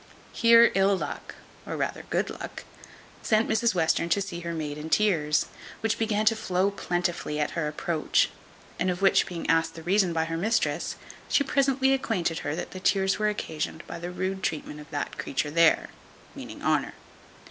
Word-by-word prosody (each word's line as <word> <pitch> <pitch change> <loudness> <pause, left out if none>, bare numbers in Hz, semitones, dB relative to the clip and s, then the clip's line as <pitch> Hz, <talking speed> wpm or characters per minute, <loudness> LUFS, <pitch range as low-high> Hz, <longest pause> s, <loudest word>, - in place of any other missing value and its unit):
Here 230 0 +6
ill 195 +1 +3
luck, - - -6 0.3
or - - -5
rather - - -3
good - - 0
luck, - - -7 0.6
sent 220 +1 +2
Mrs 225 -1 +2
Western 170 0 +1
to 185 - +3
see 195 -3 -4
her 170 -1 -4
maid 150 -3 -4
in 155 +1 -6
tears, 160 -7 +2 0.4
which 225 -1 0
began 215 -1 +1
to 225 +1 +5
flow 195 -2 0
plentifully 175 -5 -2
at 150 - 0
her 165 -3 -2
approach; 155 +1 +1 0.5
and 185 - +1
of 180 +2 -2
which 195 - +4
being 175 -3 -5
asked 165 0 +2
the 165 - -9
reason 190 +1 +2
by 160 -1 0
her 165 0 -3
mistress, 220 +7 0 0.3
she 280 - +3
presently 270 -1 +2
acquainted 185 -11 -1
her 145 - -3
that - - -6
her 185 - -6
tears 190 +1 +2
were 215 0 +2
occasioned 160 -5 -4
by - - -7
the 175 +1 -5
rude 190 +1 -3
treatment 150 -3 -3
of 150 +1 -12
that 145 -2 -4
creature 145 +2 -2
there 165 0 +4 0.4
meaning - - -9
Honour. - - +1
180 Hz, 180 wpm, -27 LUFS, 165-210 Hz, 0.6 s, Here